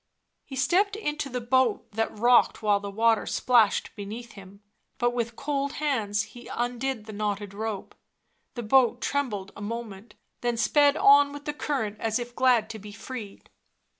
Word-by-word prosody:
He 270 - -9
stepped 375 +10 +2
into 300 -9 -3
the 250 -1 -3
boat 245 -1 +1
that 225 0 -2
rocked 240 0 +4
while 205 -1 +3
the 200 0 -6
water 225 +2 +2
splashed 235 -5 +2
beneath 225 +3 -7
him; 200 0 -14 0.3
but 240 -1 +1
with 235 -1 -2
cold 280 +1 -2
hands 220 -8 0
he 240 +2 -12
undid 245 -1 -3
the 215 - -9
knotted 205 -1 -3
rope. 215 -1 -5 0.6
The 240 - -4
boat 245 +1 +4
trembled 215 -11 -2
a - - -10
moment, 215 -1 -6 0.2
then 240 -1 -1
sped 285 +5 +4
on 285 0 +6
with 290 0 -9
the 295 - -2
current 240 -9 -3
as 220 -1 0
if 240 0 -6
glad 250 -4 +3
to 220 - -8
be 205 +1 -10
freed. 225 -1 -9
235 Hz, 165 wpm, -27 LUFS, 210-265 Hz, 0.6 s, on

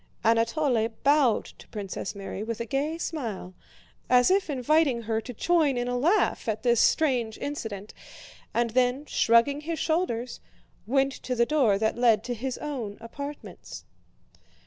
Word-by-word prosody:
Anatole 230 +1 +2 0.2
bowed 280 -5 +3
to - - -15
Princess 200 -2 -5
Mary 195 0 -6
with 225 +1 -4
a 235 - -3
gay 285 +6 -2
smile, 230 - -5 0.6
as 250 +6 +5
if 385 -2 +2
inviting 275 -2 +2
her 220 0 -1
to 250 - -8
join 300 +1 +2
in 245 0 -1
a 245 - -1
laugh 305 - +1
at 215 0 -2
this 240 -2 +3
strange 245 -8 +2
incident, 220 -8 -5 0.6
and 235 -1 0
then 255 +4 +1
shrugging 235 +3 +3
his 325 +2 -4
shoulders 310 -9 -1 0.5
went 270 +2 +2
to 255 - -4
the 235 0 +3
door 250 -8 +3
that 220 +3 -1
led 225 -3 +4
to 245 - -3
his 250 +2 -4
own 245 -9 -5
apartments. 280 +6 -9
245 Hz, 150 wpm, -27 LUFS, 225-290 Hz, 0.6 s, as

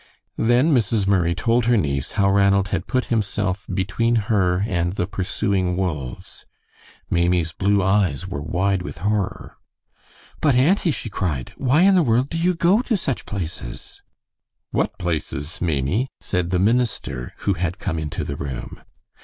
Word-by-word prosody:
Then 125 +7 +3
Mrs. 115 -4 +2
Murray 90 -4 +2
told 115 +6 +1
her 120 0 +4
niece 70 -6 -1
how 100 -3 +2
Ranald 100 0 +3
had 85 - -2
put 130 -1 0
himself 100 -3 -1
between 105 +6 0
her 100 -4 +1
and 85 -5 -1
the 90 - -1
pursuing 95 -1 -1
wolves. 75 -10 -4 0.7
Maimie's 85 -1 +2
blue 100 +2 +1
eyes 95 -4 +1
were 90 -6 -4
wide 90 +5 0
with 90 - -7
horror. 100 +3 -2 0.8
"But, 145 -5 +3
auntie," 170 +8 +3
she 115 -6 -3
cried, 75 -11 -3
"why 135 +4 +2
in 195 +1 +6
the 185 - +5
world 125 -1 +2
do 165 - -3
you 180 +2 +2
go 180 +7 +3
to 235 -4 0
such 135 -8 -3
places?" 85 -10 -6 0.7
"What - - -1
places, 80 -2 -4
Maimie?" 85 - 0
said 90 -1 -1
the 90 - +1
minister, 105 - 0
who 100 - +3
had 90 +1 -2
come 80 -3 -3
into 75 -2 -3
the 70 - -4
room. 65 -4 -6
95 Hz, 155 wpm, -22 LUFS, 85-115 Hz, 0.8 s, in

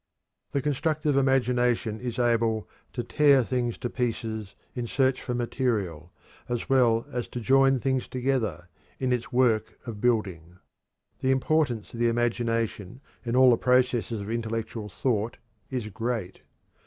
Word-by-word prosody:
The 140 - 0
constructive 150 +1 0
imagination 125 -4 +2
is 120 -2 -5
able 115 -3 +1 0.3
to 120 - -3
"tear 140 -2 +4
things 120 -1 -1
to - - -3
pieces" 110 -4 -3 0.2
in 120 -2 -4
search 130 +1 +1
for 125 - -3
material, 105 - -2 0.4
as 120 -1 -2
well 120 -4 +3
as 125 -2 -3
to 125 - -6
"join 135 +3 +4
things 130 0 0
together" 120 - -1 0.3
in 130 -1 +1
its 120 -1 -3
work 120 -3 +2
of 110 -4 -7
building. 95 -8 -1 0.6
The 130 - 0
importance 135 -3 +1
of 115 - -7
the 120 - +3
imagination 115 -2 -1 0.2
in 120 0 -2
all 130 0 +7
the 115 - +4
processes 125 -4 +1
of 100 +2 -5
intellectual 115 -1 -3
thought 115 0 -1 0.3
is 125 -4 -3
great. 110 -3 -4
120 Hz, 140 wpm, -27 LUFS, 110-130 Hz, 0.6 s, all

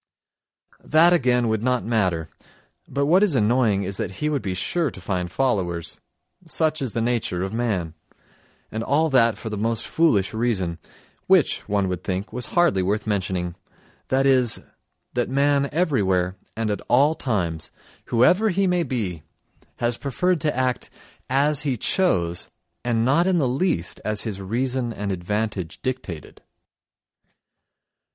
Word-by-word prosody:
That 165 +3 +5
again 125 -6 +2
would 110 -1 0
not 125 +1 0
matter, 95 -8 0 0.6
but 140 0 -1
what 175 +6 +4
is 200 -8 +3
annoying 110 -3 +2
is 95 +1 -3
that - - -3
he 150 +9 -2
would 145 -3 -1
be 95 -2 -3
sure 160 - 0
to 95 - -10
find 90 -1 -3
followers—such 135 - -2
is 130 -5 -2
the 115 - 0
nature 115 -7 -1
of 95 +2 -4
man. 105 -9 -1 0.8
And 110 +1 -3
all 155 +5 +2
that 115 -5 +4
for 110 0 -6
the 105 - -3
most 115 +1 -1
foolish 110 - +2
reason, 105 -7 -1 0.5
which, - - +3
one 100 -1 +1
would 90 -1 -3
think, 95 +2 -3
was 125 -2 -2
hardly 170 - +4
worth 105 +4 -1
mentioning: 95 -4 -1 0.5
that 135 +1 +2
is, 130 -4 +4 0.5
that 120 -1 -1
man 140 +1 +2
everywhere 95 - +1 0.2
and 110 -2 0
at 105 - -3
all 140 +5 +4
times, 90 - -2 0.4
whoever 180 - +4
he 195 +1 +1
may 180 -1 +2
be, 110 - -3 0.5
has 120 0 -1
preferred 175 +5 0
to 150 -4 0
act 130 -1 -1 0.4
as 140 +2 +2
he 140 -4 -1
chose 90 - 0 0.3
and 115 -2 +1
not 155 +8 +3
in 185 -2 +3
the 145 -6 +2
least 125 - -1
as 105 -1 0
his 100 -4 -5
reason 120 +4 -1
and 100 -2 -3
advantage 95 -1 -3
dictated. 110 - -5
115 Hz, 150 wpm, -23 LUFS, 95-140 Hz, 0.8 s, That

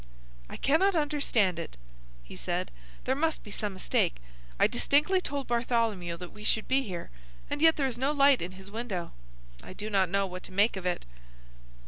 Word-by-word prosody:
"I - - -7
cannot 350 +7 +3
understand 280 - +1
it," 165 - -7 0.5
he - - -11
said. 60 - -2 0.3
"There 260 - +1
must 320 +4 0
be 210 - -10
some 205 0 -3
mistake. 185 - +1 0.4
I - - +6
distinctly 300 +9 +3
told 280 -4 -3
Bartholomew 230 -7 0
that 180 0 -8
we 210 - -11
should 220 0 0
be 265 +1 +3
here, 185 - -6 0.4
and 290 - -2
yet 320 0 +7
there 280 - 0
is 245 -3 -2
no 270 +3 +2
light 280 -2 +5
in 180 +2 -4
his 190 +1 -11
window. 210 -6 -4 0.5
I - - -10
do 210 +3 -5
not 190 -3 +3
know 200 +1 +2
what 185 -1 -6
to - - -10
make 200 +4 +3
of 185 -1 -3
it." 180 - -2
220 Hz, 190 wpm, -29 LUFS, 185-280 Hz, 0.5 s, yet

